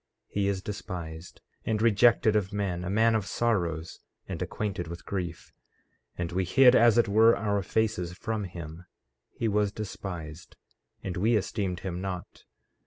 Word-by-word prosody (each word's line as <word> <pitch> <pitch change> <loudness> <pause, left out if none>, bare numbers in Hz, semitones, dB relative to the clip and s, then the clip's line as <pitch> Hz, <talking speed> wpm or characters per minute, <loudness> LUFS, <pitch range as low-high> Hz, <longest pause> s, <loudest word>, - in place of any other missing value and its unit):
14:3 - - -33
He 100 -1 +1
is 100 -1 -1
despised 90 -5 -7 0.2
and 110 -1 0
rejected 115 0 +4
of 100 -2 +1
men; 100 -4 -2
a 90 - -3
man 110 +3 +3
of 105 -3 0
sorrows, 85 -8 -1 0.3
and - - -5
acquainted 95 -5 -3
with 85 +1 -8
grief; 90 -4 -5 0.6
and 85 -1 -3
we 95 +2 0
hid 125 +7 +6
as 120 -2 +6
it 120 - +4
were 110 +3 +5
our 100 -2 0
faces 95 -4 -1
from 110 +3 -3
him; 85 -1 -9 0.4
he 115 - -3
was 105 -1 +1
despised, 90 -6 -7 0.5
and 90 -2 -4
we 110 +6 +3
esteemed 100 -3 -1
him 90 -2 -4
not. 95 -2 -6
100 Hz, 160 wpm, -28 LUFS, 90-110 Hz, 0.6 s, hid